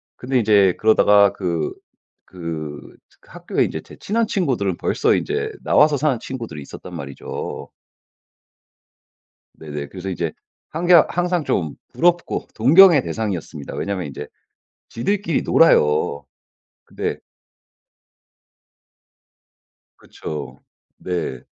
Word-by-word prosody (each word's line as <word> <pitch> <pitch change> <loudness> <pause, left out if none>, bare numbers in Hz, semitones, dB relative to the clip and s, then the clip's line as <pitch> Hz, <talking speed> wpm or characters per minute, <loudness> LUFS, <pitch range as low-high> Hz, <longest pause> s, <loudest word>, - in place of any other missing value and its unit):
근데 130 0 -1
인제 100 -4 +4
그러다가 105 -2 +5
그, 85 -5 -2 0.5
그, 80 -5 -7 0.3
그 - - -24
학교에 - - -1
이제 - - -3
제 - - -14
친한 225 +2 -1
친구들은 120 - -1
벌써 - - +1
인제 - - -2
나와서 150 -1 +4
사는 140 -3 0
친구들이 115 - -7
있었단 - - -10
말이죠. 70 -1 -7 1.9
네네. 75 -2 -6
그래서 95 0 -7
이제 85 -3 -2 0.4
항개 175 +3 +1 0.2
항상 175 -1 0
좀 80 - -1 0.2
부럽고 175 0 +1
동경의 155 - +7
대상이었습니다. 90 -9 -5
왜냐면 95 -5 -3
인제 70 - -8 0.6
지들끼리 180 - -1
놀아요. 75 - +3 0.6
근데 - - -4 2.8
그쵸. 75 -1 -8 0.4
네. 85 -9 -4
100 Hz, 235 characters per minute, -21 LUFS, -, 2.8 s, 동경의